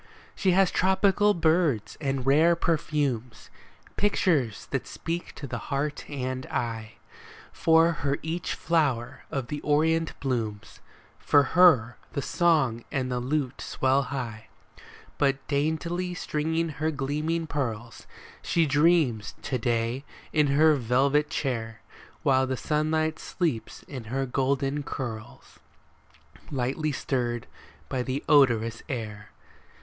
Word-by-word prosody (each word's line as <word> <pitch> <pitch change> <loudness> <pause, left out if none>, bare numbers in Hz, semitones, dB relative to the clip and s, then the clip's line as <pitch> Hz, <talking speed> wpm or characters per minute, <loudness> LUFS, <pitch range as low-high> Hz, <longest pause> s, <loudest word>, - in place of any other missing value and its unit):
She 185 -2 +1
has 190 0 +4
tropical 195 +2 +3
birds 160 - +1
and 135 -3 -1
rare 155 +5 +5
perfumes; 145 -8 -1 0.5
Pictures 155 - +1
that 135 - -2
speak 170 +2 -5
to 145 - -7
the 120 -3 -4
heart 145 +1 -2
and 130 -2 -4
eye; 110 -2 -3 0.6
For 165 +1 +4
her 145 -4 -1
each 165 +2 -3
flower 135 -7 0
of 135 -3 -3
the 145 -1 -4
Orient 160 +2 +1
blooms, 115 -6 -3 0.2
— - - -28
For 145 -1 +4
her 160 -10 +5 0.2
the 140 - -1
song 150 -10 +2
and 130 -2 -1
the 125 - -1
lute 135 +1 -2
swell 135 +1 +1
high; 120 -6 -5 0.7
But 140 -1 +1
daintily 170 +5 -1
stringing 160 0 -1
her 155 +1 -2
gleaming 155 +3 -1
pearls 120 -6 -4 0.3
She 165 -1 +2
dreams 145 -6 +2
to 130 - -2
day 115 +3 -1 0.3
in 150 -2 +4
her 155 +3 +5
velvet 135 +5 +2
chair. 115 -5 -3 0.4
While 130 -1 +3
the 130 0 -2
sunlight 155 +2 0
sleeps 160 -11 -3
in 130 -5 -8
her 135 +4 -2
golden 135 +2 0
curls, 115 -6 -7 0.9
Lightly 140 +3 -1
stirred 120 -4 -2 0.4
by 130 - -2
the 130 +3 -3
odorous 115 -6 +4
air. 105 -5 -5
140 Hz, 125 wpm, -27 LUFS, 125-160 Hz, 0.9 s, rare